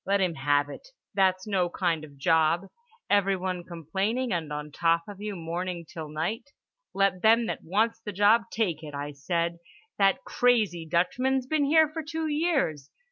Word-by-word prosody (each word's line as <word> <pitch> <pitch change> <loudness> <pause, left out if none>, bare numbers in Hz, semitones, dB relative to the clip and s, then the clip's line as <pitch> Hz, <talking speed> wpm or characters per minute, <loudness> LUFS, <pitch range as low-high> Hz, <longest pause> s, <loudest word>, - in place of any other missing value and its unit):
Let 200 +1 +1
him 185 -3 +1
have 145 0 +1
it. 325 - -10 0.3
That's 190 -1 +2
no 190 -4 +1
kind 170 -3 -1
of 150 -2 -11
a - - -19
job, 160 +4 +2 0.4
everyone 190 -3 +1
complaining 190 - -2
and 160 -4 -3
on 150 0 -5
top 165 +2 +2
of 205 -1 -9
you 210 -1 -4
morning 170 +1 -4
till 155 -1 -7
night. 170 - -3 0.5
'Let 195 -2 +2
them 230 +2 +5
that - - -4
wants 215 +6 +1
the 210 - -4
job 205 +4 +4
take 180 -9 -1
it' 150 -2 -8
I 145 +1 -4
said. 170 +4 -2 0.4
That 195 -1 +3
crazy 215 -10 +1
Dutchman's 250 +10 +1
been 295 +1 +1
here 315 +2 +5
for 315 +2 -5
two 320 +1 -4
years. 295 - 0
185 Hz, 175 wpm, -27 LUFS, 165-225 Hz, 0.5 s, them